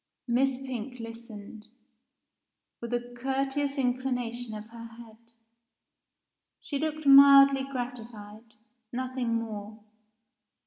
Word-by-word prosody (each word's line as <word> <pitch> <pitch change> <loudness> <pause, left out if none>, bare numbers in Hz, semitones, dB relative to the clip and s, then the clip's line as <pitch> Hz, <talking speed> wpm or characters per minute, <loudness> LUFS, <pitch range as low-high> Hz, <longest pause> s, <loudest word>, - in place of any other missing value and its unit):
Miss 255 +2 +1
Pink 250 -1 -6
listened, 225 -2 -10 1.1
with 235 0 -6
a 245 0 -3
courteous 270 +3 -2
inclination 245 -3 -2
of 210 0 -7
her 230 0 -9
head. 230 0 -16 1.3
She 280 - -4
looked 310 0 -3
mildly 275 -1 +8
gratified, 230 -4 -8 0.4
nothing 255 -1 -2
more. 215 -1 -6
245 Hz, 90 wpm, -28 LUFS, 230-270 Hz, 1.3 s, mildly